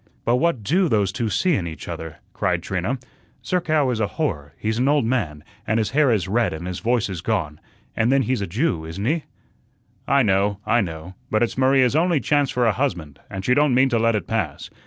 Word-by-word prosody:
"But 120 +1 +3
what 145 -6 0
DO 175 - +2
those 105 -5 +2
two 115 +1 -2
see 180 - +1
in 90 - -1
each 80 - -8
other?" 80 -2 -6 0.2
cried - - -1
Trina. 95 +8 -2 0.5
"Zerkow 155 -7 +1
is 115 - -2
a 105 - +1
horror, 80 - -2
he's 110 +2 -2
an 130 - +2
old 145 -4 +3
man, 85 - -1 0.2
and 110 - +1
his 110 -2 0
hair 145 0 +3
is 105 -7 +1
red 115 +1 +1
and 80 +2 -6
his 90 -1 -4
voice 120 0 +1
is 90 -4 -5
gone, 85 -8 -2 0.4
and 115 +3 +2
then 135 0 +3
he's 125 -4 -1
a 100 - -2
Jew, 95 - -1
isn't 80 +6 -5
he?" 155 +4 0 0.8
"I 140 0 +4
know, 100 -1 +1
I 115 +1 +3
know; 85 0 -6 0.2
but 110 +2 +2
it's 120 - -1
Maria's 130 0 +3
only 170 0 +3
chance 145 -1 +1
for 125 -1 +1
a 115 - +4
husband, 85 - -3
and 95 0 -6
she 125 - +3
don't 145 -2 +3
mean 130 +1 +4
to 120 -3 +1
let 115 0 +2
it 105 - -2
pass. 105 -11 -3
115 Hz, 225 wpm, -22 LUFS, 95-135 Hz, 0.8 s, I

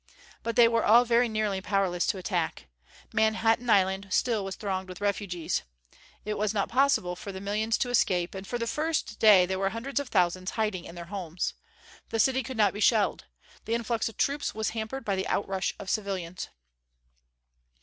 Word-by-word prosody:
But 230 -1 -3
they 235 -1 +7
were 230 -1 +1
all 235 +3 +6
very 235 0 +3
nearly 215 -3 -1
powerless 190 -3 0
to - - 0
attack. 180 -3 -2 0.5
Manhattan 225 +2 +2
Island 195 -1 +3
still 225 +1 +1
was 195 0 -5
thronged 190 -2 -3
with 185 - -8
refugees. 200 -4 -1 0.6
It 210 -1 -3
was 210 0 0
not 200 - 0
possible 255 -9 +2
for 200 - -7
the 190 - -7
millions 210 +3 0
to 245 - -1
escape; 180 -7 +1
and 190 0 -7
for 240 - -2
the 230 - -2
first 305 -3 -2
day 205 -5 +7
there 190 +1 -2
were 195 0 +1
hundreds 255 +7 -3
of 285 -3 -5
thousands 185 -1 +1
hiding 210 -5 -1
in 170 - -10
their 170 -1 -7
homes. 180 -3 -3 0.6
The 225 - -2
city 265 +3 +3
could 260 -2 -7
not 210 -2 +3
be 205 - -6
shelled. 215 -1 +2 0.4
The 230 - 0
influx 230 -1 -1
of 225 - -15
troops 285 -3 0
was 220 0 -1
hampered 230 +3 -5
by 200 - 0
the 190 - -2
outrush 195 -1 -1
of 200 - -9
civilians. 190 -4 -3
210 Hz, 190 wpm, -28 LUFS, 190-230 Hz, 0.6 s, they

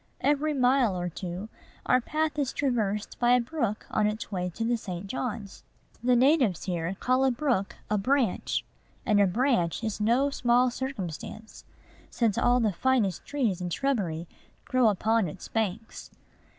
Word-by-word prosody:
Every 295 +1 +1
mile 250 -6 +3
or 175 0 -2
two, 180 +4 -6 0.4
our 255 - +3
path 305 +3 -1
is 275 -3 -1
traversed 215 -7 -1
by 240 0 +4
a 250 - +5
brook 235 -4 -2
on 210 -1 +2
its 215 +1 -4
way 180 -2 -2
to 230 - -2
the 240 +1 +1
St. 185 -4 -6
John's. 210 -2 -5 0.4
The 250 0 +4
natives 255 - +3
here 175 0 -2
call 255 +1 +2
a 265 - +4
brook 245 -6 0
a 210 0 +1
"branch;" 250 -1 0 0.4
and 210 -3 +4
a 200 - +5
branch 225 - +1
is 220 -1 -3
no 245 +6 +3
small 245 -1 +3
circumstance, 220 - -6 0.4
since 225 -4 +1
all 245 +1 +3
the 215 -4 +1
finest 225 -5 +1
trees 230 -11 -1
and 180 -1 -3
shrubbery 175 - -1 0.4
grow 255 -3 +3
upon 220 +1 +1
its 150 - -8
banks. 225 0 -3
225 Hz, 160 wpm, -28 LUFS, 195-255 Hz, 0.4 s, a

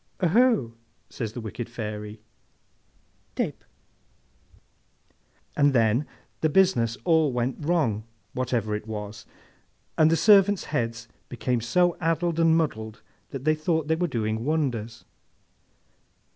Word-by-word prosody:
'Oho!' 205 - +3 0.4
says 110 -3 -5
this 120 - -6
wicked 115 +2 -6
Fairy. 105 -2 -6 1.1
'—Tape!' - - -3 1.9
And 145 -1 +3
then 115 +3 +2 0.3
the 160 - +1
business 145 -10 +2
all 160 -4 +3
went 125 +4 -2
wrong, 145 -11 0 0.3
whatever 120 -4 -1
it 105 +1 -4
was, 105 -1 -7 0.7
and 155 0 +6
the 165 - +3
servants' 200 +1 +5
heads 115 -4 -2 0.2
became 125 0 -1
so 175 +9 +2
addled 165 0 0
and 165 -1 +4
muddled 110 -9 -3 0.3
that 135 -2 -7
they 155 - +4
thought 155 0 -1
they 160 - +3
were 175 +2 0
doing 110 -4 -2
wonders. 120 -7 -2
130 Hz, 115 wpm, -26 LUFS, 115-160 Hz, 1.9 s, and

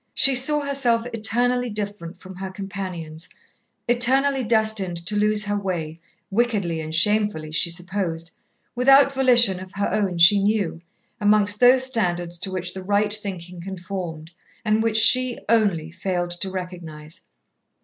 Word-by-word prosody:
She 270 - +4
saw 295 +4 +4
herself 265 -5 0
eternally 245 +3 0
different 205 -4 -6
from 185 0 -13
her 190 0 -6
companions, 185 -5 -7 0.6
eternally 260 +3 +2
destined 220 -5 +1
to 210 - -2
lose 210 0 +3
her 205 0 -2
way, 170 -5 -5 0.3
wickedly 200 -7 -1
and 155 0 -7
shamefully 205 -4 +1
she 155 +2 +2
supposed, 170 -2 -4 0.4
without 275 +3 +4
volition 240 -8 +4
of 185 +1 -11
her 200 -1 -2
own 200 -4 -1
she 185 +4 +6
knew, 200 -5 -1 0.4
amongst 205 0 +2
those 255 +1 +5
standards 175 -9 -1
to 190 +1 -4
which 180 -1 -4
the 190 - -7
right 205 +2 0
thinking 180 -4 -7
conformed, 175 -3 -7 0.3
and 215 0 +1
which 225 -1 0
she, 255 +2 +6
only, 195 -9 +1
failed 175 0 -3
to 175 +2 -4
recognize. 175 -3 -6
200 Hz, 140 wpm, -22 LUFS, 175-225 Hz, 0.6 s, she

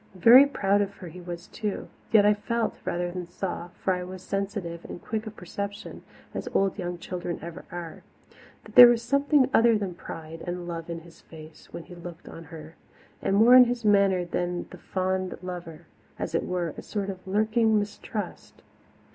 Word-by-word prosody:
Very 240 +9 +8
proud 200 -6 +1
of 200 0 -3
her 180 -4 -10
was 175 0 -7
he - - -23
too; 210 -3 -3 0.2
yet 210 -2 +6
I 210 - +6
felt, 230 +2 -2
rather 175 0 -2
than 180 -1 -6
saw 175 -1 -4 0.2
for 190 - +2
I 180 - -3
was 185 0 -9
sensitive 195 -4 -3
and - - -7
quick 220 +3 -4
of 215 - -8
perception, 200 +3 -6 0.3
as - - -5
old 195 +1 +1
young 175 -1 -3
children 175 0 -5
ever 170 +1 -8
are 170 -2 -7 0.6
that - - -14
there 245 - +12
was 235 -1 +2
something 280 +1 +3
other 230 -1 +5
than 195 -3 -3
pride 165 -1 -9
and 175 0 -4
love 165 -1 -5
in 165 -1 -5
his 165 0 -17
face 155 -1 -14
when 170 - -7
he 180 - -13
looked 175 -1 -10
on 165 - -10
her, 155 +1 -11 0.4
and 195 - +1
more 225 +4 +7
in 255 0 +10
his 240 -1 -3
manner 200 -3 +4
than 175 0 -2
the - - -11
fond 185 0 -2
lover 175 -3 -7 0.3
as - - -4
it - - 0
were, 175 -3 -2
a - - -6
sort 200 -2 -3
of 185 0 -12
lurking 220 +2 +2
mistrust. 205 0 -5
185 Hz, 190 wpm, -27 LUFS, 175-210 Hz, 0.6 s, there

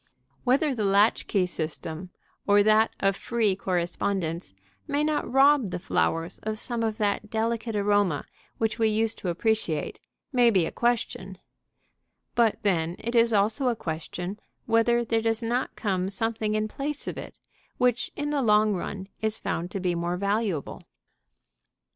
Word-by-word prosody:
Whether 275 +3 +3
the 225 -4 -2
latch 200 +2 +3
key 195 -3 +2
system, 160 +1 -4 0.4
or 205 0 +6
that 215 +1 +5
of 195 0 +2
free 220 -3 0
correspondence, 175 - -2 0.4
may 290 +1 0
not 305 0 -1
rob 270 -3 +5
the - - -3
flowers 165 -1 -1
of 215 0 -3
some 235 +1 -2
of 220 -1 -1
that 210 0 -1
delicate 225 0 -1
aroma 205 -6 +2 0.3
which 225 +1 -1
we 225 - +4
used 220 +1 0
to 180 - -3
appreciate, 175 -3 -1 0.3
may 245 -2 +5
be 190 -7 +3
a - - -4
question; 215 -5 -1 1.0
but 230 -2 +3
then 170 -4 +1
it 235 +2 -4
is 230 -1 +4
also 215 +5 +2
a 240 - +2
question 175 +3 -5 0.3
whether 235 +1 +3
there 225 0 +1
does 225 0 0
not 240 +3 -1
come 190 -3 -1
something 215 +1 -1
in 215 0 0
place 280 +6 -4
of - - -3
it - - -8 0.4
which 245 -1 +1
in 295 0 -2
the 290 -2 +1
long 210 -2 +4
run 190 +1 -4
is 220 0 0
found 165 +2 -3
to 195 - -4
be 180 -1 0
more 170 +1 -2
valuable. 200 -4 -1
215 Hz, 160 wpm, -26 LUFS, 185-230 Hz, 1.0 s, or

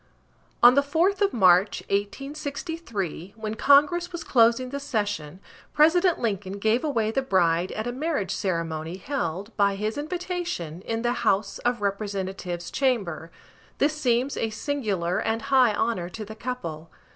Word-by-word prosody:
On 245 - +10
the 280 - +5
4th 335 +8 +1
of 400 -1 +3
March, 185 -1 +4
1863, 275 - -4
when 220 -1 -4
Congress 295 +9 +4
was 345 -1 -5
closing 240 0 +3
the 280 - -3
session, 205 - -3 0.3
President 340 +4 +4
Lincoln 200 -4 -2
gave 220 +4 +1
away 230 -8 0
the 270 - 0
bride 180 -6 +2
at 215 - -4
a 245 - -2
marriage 275 - -2
ceremony 165 -3 -3
held 195 - -4
by 200 -1 +3
his 215 +6 -3
invitation 345 - -4
in 225 0 -2
the 240 0 +1
House 195 +1 +1
of 240 -2 -1
Representatives' 195 -3 -3
chamber. 205 - -1 0.5
This 300 +2 +2
seems 255 -2 +1
a 225 - -1
singular 215 - -2
and 225 0 -1
high 250 -5 +5
honor 205 -6 -1
to 215 +3 -7
the 220 - -8
couple. 175 -10 -5
225 Hz, 145 wpm, -25 LUFS, 190-280 Hz, 0.5 s, On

